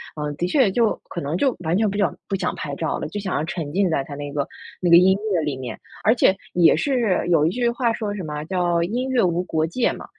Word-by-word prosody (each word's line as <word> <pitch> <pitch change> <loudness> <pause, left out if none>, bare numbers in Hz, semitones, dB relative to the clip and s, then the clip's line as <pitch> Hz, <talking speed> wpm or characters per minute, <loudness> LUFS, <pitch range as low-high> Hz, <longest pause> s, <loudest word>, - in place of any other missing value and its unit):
嗯， 150 -1 -4
的 175 - -1
确 230 -2 +3
就 230 +1 +2 0.2
可 175 - -5
能 145 +4 -2
就 265 +6 +1
完 165 +1 0
全 215 0 +2
不 200 - -4
想 195 -7 +1
不 195 - -1
想 185 -1 -1
拍 140 -2 -5
照 160 +1 -2
了， - - -4
就 205 +6 -5
想 190 -2 -3
要 150 - 0
沉 165 -4 -5
浸 195 -1 +2
在 140 -4 0
它 145 - -9
那 145 0 -6
个 140 -1 -2 0.3
那 175 -2 +1
个 170 - +10
音 190 +2 +5 0.2
乐 170 - +2
里 145 -3 -2
面。 125 -4 -6 0.2
而 220 - +5
且 195 -5 +3 0.2
也 175 -2 +5
是 240 -11 0
有 155 -3 +4
一 - - +3
句 240 +4 0
话 235 -2 0
说 210 -2 -3
什 195 - -5
么 150 -1 -5
叫 175 -1 +1
“音 250 +7 -2
乐 250 -5 +2
无 175 0 +1
国 160 -3 0
界” 205 +10 0
嘛， - - -9
180 Hz, 290 characters per minute, -22 LUFS, 155-210 Hz, 0.3 s, 个